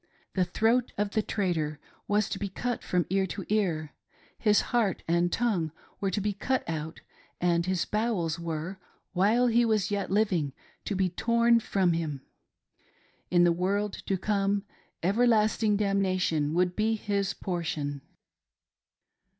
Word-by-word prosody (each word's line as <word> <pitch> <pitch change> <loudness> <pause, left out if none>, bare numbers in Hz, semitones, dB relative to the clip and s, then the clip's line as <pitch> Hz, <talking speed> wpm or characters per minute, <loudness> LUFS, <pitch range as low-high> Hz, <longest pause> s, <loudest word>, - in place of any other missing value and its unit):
— - - -35
The 185 -2 +2
throat 225 +7 +1
of 205 0 0
the 215 - +1
traitor 165 -9 -1 0.3
was 210 0 +2
to 195 - -3
be 200 - -3
cut 245 +5 -3
from 180 -1 0
ear 190 0 +2
to 195 0 -6
ear; 170 -8 0 0.5
his 210 -2 +4
heart 220 -7 +1
and 170 +1 +2
tongue 195 -10 0 0.3
were 195 - 0
to 190 - -1
be 205 +1 -1
cut 255 +6 -1
out; 160 -1 -4 0.4
and 170 0 +1
his 185 -2 0
bowels 205 -8 -1
were 170 +3 -4 0.2
— - - -43
while 210 +7 +3
he 240 0 +4
was 215 -3 +1
yet 200 -1 -1
living 185 -9 +1 0.2
— - - -34
to 205 - -2
be 190 -1 +1
torn 235 +5 +3
from 190 -5 +1
him. 155 -5 -3 1.1
In 175 -1 +4
the 175 - +5
world 195 +4 0
to 195 - +1
come, 200 +1 0 0.4
everlasting 215 +1 +3
damnation 185 -7 +1
would 180 0 +2
be 220 +1 +1
his 200 -2 -1
portion. 150 -6 -3
195 Hz, 155 wpm, -28 LUFS, 170-215 Hz, 1.1 s, the